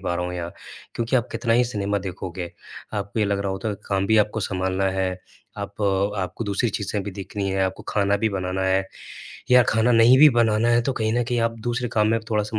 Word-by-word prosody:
पा 90 - -2
रहा 90 0 -2
हूँ 90 - -5
यहाँ। 85 -1 -5 0.4
क्योंकि 115 +3 0
आप 120 -1 0
कितना 115 0 0
ही 125 - +4
सिनेमा 100 -3 -2
देखोगे, 90 -2 -6 0.4
आपको 100 +1 -4
ये 105 - +3
लग 100 0 0
रहा 100 0 -2
होता 105 +3 -3 0.2
काम 100 -1 0
भी 110 - +3
आपको 105 +1 +1
संभालना 95 0 -1 0.2
है। 95 -1 +1 0.5
आप 100 +1 -6 0.4
आपको 95 +5 -3
दूसरी 100 +3 0
चीजें 100 0 -3
भी 100 - -5
देखनी 100 +1 -4
हैं, 95 0 0
आपको 95 0 -4
खाना 100 -1 +1
भी 110 +2 0
बनाना 95 -1 -2
है 95 0 +1 0.6
या 125 0 +8
खाना 110 +2 +3
नहीं 115 +2 +6
भी 150 - +9
बनाना 115 -1 +2
है 120 0 +3
तो 135 +3 -1
कहीं 110 -2 -1
न 120 - +1
कहीं 120 0 -1
आप 115 0 0
दूसरे 120 +1 -2
काम 105 -1 +3
में 115 +1 +2
थोड़ा-सा 105 0 -1
105 Hz, 225 wpm, -23 LUFS, 95-115 Hz, 0.6 s, भी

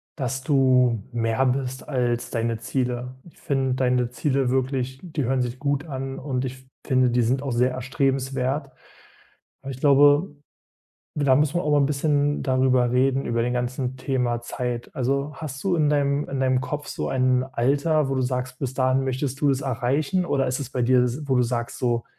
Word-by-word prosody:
dass 130 -2 -3
du 130 -6 +3
mehr 115 +2 0
bist 130 0 -2
als 120 -3 -1
deine 115 0 -1
Ziele. 125 +1 -3 0.2
Ich - - -25
finde 135 -2 0
deine 125 -2 +1
Ziele 135 0 0
wirklich 130 0 -1
die 160 -6 -3
hören 130 +1 +1
sich 120 +1 -5
gut 145 +1 -1
an. 135 -2 -5
Und 130 -2 -3
ich 130 -1 -3
f - - -25 0.2
finde, 130 -3 +3
die 120 0 +2
sind 130 +4 0
auch 135 - -3
sehr 125 +2 +2
erstrebenswert. 135 +1 -1 0.9
Aber 135 - -5
ich 130 - -8
glaube, 145 +3 +4 0.8
da 140 -3 +4
muss 150 +1 +1
man 175 - +1
auch 150 - -1
mal 145 - +4
'n 140 - +3
bisschen 145 0 +1
darüber 130 -2 +2
reden, 135 +1 +2
über 115 0 0
den 125 +1 0
ganzen 125 +1 -2
Thema 125 -3 -1
Zeit. 120 0 -4
Also 140 +2 -1
hast 135 -4 -7
du 185 -2 +2
in 155 -2 +2
deinem 145 0 +1
in 135 -1 -3
deinem 130 -1 +2
Kopf 145 +3 -4
so - - -3
ein 130 -1 +2
Alter, 140 +4 +1
wo 135 - -1
du 130 - +1
sagst, 125 0 -3
bis 135 -2 -3
dahin 130 0 +2
möchtest 135 +1 -2
du 145 - +3
es 135 -1 0
erreichen, 135 +8 0
oder 135 -5 +1
ist 125 +2 -1
es 140 - -5
bei 125 - -3
dir 125 +1 +4
s 125 +5 -3
wo 130 -2 +2
du 125 - +4
sagst, 120 0 -3
so 120 -2 0
130 Hz, 195 wpm, -24 LUFS, 125-140 Hz, 0.9 s, glaube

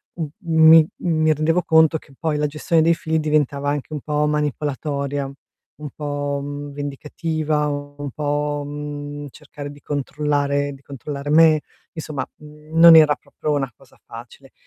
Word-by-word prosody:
m 165 -3 -3
mi 160 -1 +6
mi 155 -2 +1
rendevo 160 +4 +1
conto 160 -1 +4
che 140 - -18
poi 160 -2 -1
la 150 - 0
gestione 160 +3 +1
dei 165 +1 +4
figli 160 -1 -1
diventava 145 -2 0
anche 145 +1 -3
un 150 - -4
po' 150 0 0
manipolatoria, 145 -1 -2 0.4
un 150 -1 -8
po' 145 -1 -3
mhmm, 145 0 -6
vendicativa, 150 +2 -2
un 145 -1 -5
po', 145 0 -2
mhmm, 145 0 -6
cercare 145 +2 -9
di 145 0 -15
controllare 145 0 -1
di 135 - -14
controllare 140 +1 -7
me, 155 -1 +6 0.3
insomma 150 -5 -5
mhmm, 150 +1 -10
non 170 -1 +10
era 155 -2 +7
proprio 150 - -5
una 135 -3 -1
cosa - - -22
facile. - - -12
150 Hz, 150 wpm, -21 LUFS, 145-155 Hz, 0.4 s, non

